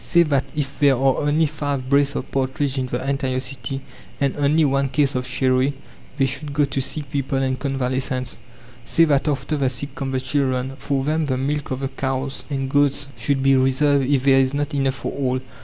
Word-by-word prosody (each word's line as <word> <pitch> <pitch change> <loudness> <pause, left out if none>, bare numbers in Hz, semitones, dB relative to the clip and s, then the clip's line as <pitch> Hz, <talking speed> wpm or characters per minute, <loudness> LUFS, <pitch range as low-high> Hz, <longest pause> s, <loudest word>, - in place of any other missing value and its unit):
Say 170 -1 +4
that 140 -4 +1
if 140 -2 -3
there 140 -2 +5
are 135 +1 +2
only 150 +2 +2
five 145 -3 -3
brace 140 +1 +3
of - - -4
partridge 135 +1 -1
in 130 - -1
the 125 +2 -3
entire 135 -2 0
city, 130 0 -3 0.4
and 140 -1 +1
only 150 +2 +3
one 140 0 +1
case 140 0 +2
of 125 -1 -2
sherry, 130 +1 +2 0.4
they 135 - +3
should 140 +2 -4
go 145 0 +3
to 140 -1 -2
sick 140 +1 -4
people 135 -1 -1
and 130 -1 0
convalescents. 130 -2 -2 0.4
Say 130 +8 +4
that 145 -1 +2
after 145 +1 -1
the 135 -2 +1
sick 135 +2 -4
come 135 0 -4
the 130 -1 -1
children. 130 -1 -1
For 135 +1 -1
them 155 +2 0
the 130 -2 0
milk 145 +2 -2
of 130 0 -3
the 135 - -1
cows 135 0 -3
and 135 -2 -2
goats 145 0 +1
should 135 +5 0
be 135 0 +5
reserved 135 +1 +2
if 140 -3 +2
there 135 -1 +5
is 135 +1 +1
not 145 +1 -2
enough 135 -2 +1
for - - -4
all. 130 -2 -1
135 Hz, 210 wpm, -22 LUFS, 130-145 Hz, 0.4 s, there